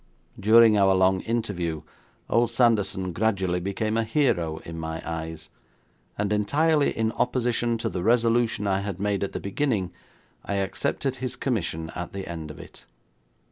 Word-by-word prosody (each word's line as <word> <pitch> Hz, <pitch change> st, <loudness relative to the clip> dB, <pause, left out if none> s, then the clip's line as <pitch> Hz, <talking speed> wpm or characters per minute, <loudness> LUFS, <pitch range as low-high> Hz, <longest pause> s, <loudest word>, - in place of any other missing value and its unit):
During 110 Hz, 0 st, +6 dB
our 95 Hz, -1 st, +5 dB
long 95 Hz, 0 st, +3 dB
interview 90 Hz, -9 st, -2 dB, 0.4 s
old 115 Hz, +1 st, +2 dB
Sanderson 105 Hz, -6 st, +2 dB
gradually 95 Hz, -3 st, 0 dB
became 105 Hz, +4 st, -2 dB
a 115 Hz, -, +2 dB
hero 110 Hz, -, +1 dB
in 85 Hz, 0 st, -7 dB
my 80 Hz, 0 st, -4 dB
eyes, 80 Hz, -1 st, -5 dB, 0.7 s
and 100 Hz, 0 st, 0 dB
entirely 145 Hz, +9 st, +2 dB
in 110 Hz, 0 st, -1 dB
opposition 120 Hz, -1 st, 0 dB
to 115 Hz, -, -2 dB
the 90 Hz, 0 st, -3 dB
resolution 115 Hz, 0 st, +2 dB
I 95 Hz, -1 st, +1 dB
had 100 Hz, -2 st, -5 dB
made 100 Hz, 0 st, 0 dB
at 100 Hz, -, -3 dB
the -, -, -3 dB
beginning, 100 Hz, -4 st, -1 dB, 0.5 s
I 100 Hz, -, -3 dB
accepted 100 Hz, +7 st, -1 dB
his 130 Hz, -1 st, -4 dB
commission 80 Hz, -, -2 dB
at 90 Hz, 0 st, -6 dB
the 95 Hz, -1 st, -5 dB
end 80 Hz, -2 st, -6 dB
of 75 Hz, -, -9 dB
it. -, -, -13 dB
100 Hz, 155 wpm, -25 LUFS, 90-115 Hz, 0.7 s, During